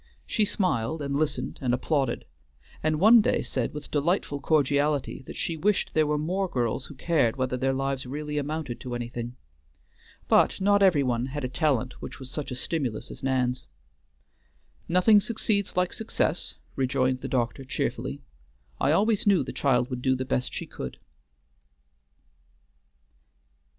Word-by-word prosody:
She 215 - +1
smiled, 160 - 0
and 140 0 -2
listened, 155 +1 -1
and 125 -2 +2
applauded, 135 -1 -1 0.6
and 155 0 +1
one 220 +5 +8
day - - +1
said 125 -3 -2
with 150 0 -8
delightful 150 -1 0
cordiality 145 -1 +1
that - - -8
she 165 - -2
wished 195 +6 0
there 155 -1 +3
were 150 0 +1
more 185 +6 -1
girls 120 -1 -1
who 145 - -11
cared 140 -6 +1
whether 130 -1 -1
their 135 +1 +1
lives 135 -1 -2
really 150 +2 -3
amounted 145 -4 -4
to 125 -1 -5
anything. 120 0 -5 0.9
But - - +4
not 200 +1 +4
every 175 -8 +5
one 125 -1 0
had 145 +1 -5
a - - 0
talent 130 -3 0
which - - -7
was 130 -1 -9
such 150 -1 -4
a 125 - -4
stimulus 130 -5 -2
as - - -9
Nan's. 125 - 0 1.2
"Nothing 195 +4 +6
succeeds 205 -3 0
like 180 -1 +2
success," 220 - -1 0.2
rejoined 130 -1 +1
the - - -4
doctor 125 +1 -1
cheerfully, 70 - -3 0.6
"I 140 - +3
always 210 +4 +2
knew 195 -4 +5
the - - -6
child 125 -2 +1
would 125 -1 -3
do 130 0 +2
the 130 0 -3
best 125 0 -1
she - - -5
could." - - -7
140 Hz, 155 wpm, -27 LUFS, 125-165 Hz, 1.2 s, one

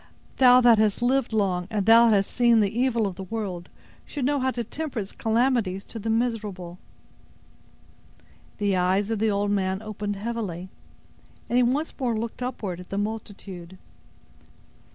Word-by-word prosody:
Thou 250 -1 +7
that 235 -3 +6
hast 215 +2 +1
lived 260 0 +1
long, 190 -5 0
and 205 -3 -1
that 230 +1 +7
hast 200 -2 +2
seen 235 -2 +4
the 210 0 +1
evil 240 -3 +1
of 190 -3 -4
the 190 - -6
world, 190 -4 -5 0.3
should 285 -4 -4
know 285 +1 +1
how 260 0 +1
to 240 -2 -3
temper 295 +3 -6
its 200 -3 -3
calamities 225 -4 0
to 225 - -8
the 225 +2 -4
miserable." 210 -7 -2 1.8
The 200 -2 +1
eyes 190 +4 +1
of 225 - -1
the 220 +1 +2
old 205 0 0
man 190 -1 0
opened 210 -1 -4
heavily, 200 -5 -4 0.8
and 240 - +3
he - - +5
once 270 +6 0
more 240 -4 0
looked 230 +2 -5
upward 210 -8 -4
at 180 - -11
the 195 - -4
multitude. 200 -4 -6
215 Hz, 165 wpm, -25 LUFS, 195-240 Hz, 1.8 s, Thou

